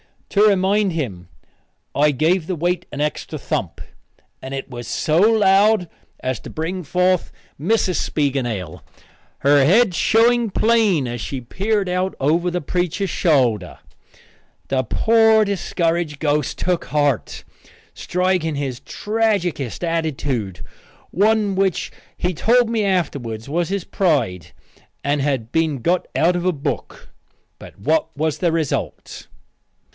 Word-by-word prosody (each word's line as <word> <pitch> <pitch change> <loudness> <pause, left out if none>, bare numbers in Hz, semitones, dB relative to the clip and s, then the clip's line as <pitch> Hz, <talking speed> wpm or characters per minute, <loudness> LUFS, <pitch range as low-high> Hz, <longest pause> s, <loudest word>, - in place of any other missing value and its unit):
To 200 - +2
remind 200 0 +2
him 100 - -4 0.7
I 150 +1 +3
gave 160 +5 +1
the 185 - -1
weight 175 +2 -1
an 145 - -4
extra 150 0 -3
thump, - - -3 0.6
and 130 +1 -7
it 135 - -4
was 120 -2 -7
so 155 +1 +1
loud 205 -2 +4 0.3
as 130 -3 -2
to - - -10
bring 175 +4 -4
forth 180 +3 +1 0.3
Mrs. 185 0 +1
Spiegelnail, 120 - -2 0.6
her 140 0 +4
head 200 - +4
showing 230 +5 +3
plain 215 - +2
as 120 0 -4
she 130 +5 -4
peered 200 - -1
out 185 +1 -1
over 165 +6 +1
the 180 0 -2
preacher's 180 +5 -1
shoulder. 130 - +1 0.9
The 130 -1 +1
poor 220 - +4
discouraged 170 -5 -1
ghost 150 -2 0
took 180 -1 -1
heart, 145 -5 -1 0.5
striking 180 -3 -1
his 135 -3 -3
tragicest 195 - -1
attitude, 145 - -2 0.5
one 210 +1 +2
which 190 -2 0 0.3
he 180 +1 -1
told 235 +7 +3
me 225 -3 0
afterwards 140 - -2
was 170 +3 0
his 195 -2 -2
pride 130 - -1 0.5
and 145 0 0
had 135 -5 -1
been 160 -4 0
got 175 +8 0
out 175 +3 +3
of 175 - -3
a 185 - +2
book. 140 -2 -5 0.5
But - - -13
what 155 +9 0
was 155 0 0
the 170 -3 +1
result? 160 -4 -3
165 Hz, 130 wpm, -20 LUFS, 140-190 Hz, 0.9 s, loud